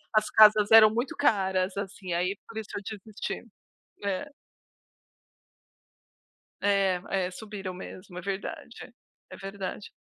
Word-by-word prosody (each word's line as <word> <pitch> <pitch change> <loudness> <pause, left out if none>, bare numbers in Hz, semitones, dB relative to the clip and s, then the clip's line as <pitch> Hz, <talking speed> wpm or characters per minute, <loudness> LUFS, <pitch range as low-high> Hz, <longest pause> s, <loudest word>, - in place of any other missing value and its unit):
as 215 0 +3
casas 215 -1 +6
eram 220 -1 +10
muito 240 +3 -2
caras, 190 -7 +1
assim, 195 -2 -5
aí 180 +3 0
por 230 - -10
isso 220 -1 -5
eu 205 - -3
desisti. 215 0 -6 0.6
É. 200 +8 -2 2.3
É, 195 -2 +2 0.3
é, 185 - -8
subiram 200 -2 -7
mesmo. 185 0 -10
É - - -4
verdade. 195 +1 -6 0.4
É - - -9
verdade. 195 +1 -6
200 Hz, 120 wpm, -28 LUFS, 190-215 Hz, 2.3 s, eram